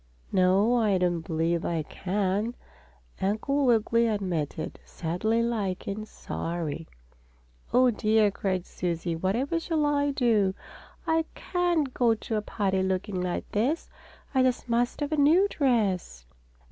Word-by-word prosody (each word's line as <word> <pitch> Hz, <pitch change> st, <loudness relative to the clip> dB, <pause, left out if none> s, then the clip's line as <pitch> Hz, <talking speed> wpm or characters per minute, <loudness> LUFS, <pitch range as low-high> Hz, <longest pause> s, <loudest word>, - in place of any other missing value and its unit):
"No, 195 Hz, +6 st, +4 dB
I 210 Hz, -5 st, +3 dB
don't 175 Hz, -2 st, +1 dB
believe 165 Hz, +1 st, -1 dB
I 165 Hz, -2 st, -1 dB
can," 200 Hz, +7 st, -1 dB, 0.7 s
Uncle 260 Hz, +8 st, +1 dB
Wiggily 230 Hz, 0 st, +3 dB
admitted, 175 Hz, -8 st, -2 dB
sadly 215 Hz, +8 st, -1 dB
like 210 Hz, -6 st, -2 dB
and 215 Hz, +2 st, -4 dB
sorry. 165 Hz, -4 st, -4 dB, 0.8 s
"Oh, 250 Hz, 0 st, +5 dB
dear!" 215 Hz, -1 st, +3 dB
cried 185 Hz, -2 st, -2 dB
Susie. 170 Hz, -1 st, -3 dB
"Whatever 235 Hz, -, 0 dB
shall 320 Hz, -2 st, 0 dB
I 290 Hz, 0 st, +2 dB
do? 225 Hz, -8 st, +2 dB, 0.5 s
I 325 Hz, -1 st, +2 dB
can't 345 Hz, -7 st, 0 dB
go 235 Hz, -2 st, +3 dB
to 220 Hz, +1 st, -4 dB
a 210 Hz, -, +1 dB
party 195 Hz, -2 st, -1 dB
looking 190 Hz, 0 st, -1 dB
like 180 Hz, -1 st, -2 dB
this! 255 Hz, +11 st, 0 dB, 0.4 s
I 265 Hz, -, +4 dB
just 255 Hz, -1 st, +1 dB
must 240 Hz, +4 st, 0 dB
have 290 Hz, +1 st, -1 dB
a 310 Hz, -, 0 dB
new 320 Hz, +8 st, +5 dB
dress." 205 Hz, -, 0 dB
215 Hz, 135 wpm, -27 LUFS, 185-250 Hz, 0.8 s, Oh